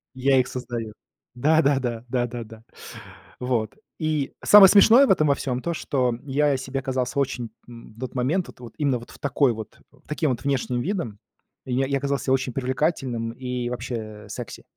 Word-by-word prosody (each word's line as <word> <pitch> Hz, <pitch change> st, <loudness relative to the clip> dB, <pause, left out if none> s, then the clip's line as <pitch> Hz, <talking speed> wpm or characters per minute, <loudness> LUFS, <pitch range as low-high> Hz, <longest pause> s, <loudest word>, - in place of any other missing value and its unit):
Я 135 Hz, +1 st, +3 dB
их 125 Hz, -, +1 dB
создаю. 120 Hz, -3 st, -5 dB, 0.4 s
Да-да-да, 135 Hz, -4 st, +2 dB
да-да-да. 120 Hz, -3 st, -4 dB, 0.8 s
Вот, 120 Hz, -4 st, -1 dB, 0.2 s
и 155 Hz, -3 st, -1 dB
самое 205 Hz, -2 st, +9 dB
смешное 225 Hz, +7 st, +7 dB
в -, -, +3 dB
этом 155 Hz, -5 st, +3 dB
во 140 Hz, -, +3 dB
всём 130 Hz, -2 st, -3 dB
то, 170 Hz, -, -2 dB
что 130 Hz, -6 st, 0 dB
я 140 Hz, 0 st, +2 dB
себе 135 Hz, +1 st, -4 dB
казался 130 Hz, 0 st, -2 dB
очень, 125 Hz, -4 st, -2 dB, 0.2 s
м, 115 Hz, -2 st, -13 dB
в -, -, -17 dB
тот 130 Hz, +1 st, -6 dB
момент, 150 Hz, +9 st, 0 dB
вот -, -, -14 dB
вот 120 Hz, -2 st, -11 dB
именно 140 Hz, -4 st, +1 dB
вот 120 Hz, -, -13 dB
в -, -, -15 dB
такой 140 Hz, -3 st, +2 dB
вот, 110 Hz, -1 st, -9 dB
в 140 Hz, -1 st, -26 dB
таким 150 Hz, -1 st, 0 dB
вот 125 Hz, -, -4 dB
внешним 130 Hz, -3 st, -1 dB
видом, 160 Hz, -, -3 dB, 0.5 s
я 130 Hz, +1 st, 0 dB
я 140 Hz, 0 st, 0 dB
казался 140 Hz, -1 st, -1 dB
очень 130 Hz, -1 st, +1 dB
привлекательным 130 Hz, -3 st, -1 dB
и 125 Hz, -1 st, -4 dB
вообще, 125 Hz, 0 st, -4 dB, 0.3 s
э, -, -, -16 dB
секси. -, -, -7 dB
130 Hz, 180 wpm, -24 LUFS, 120-140 Hz, 0.8 s, самое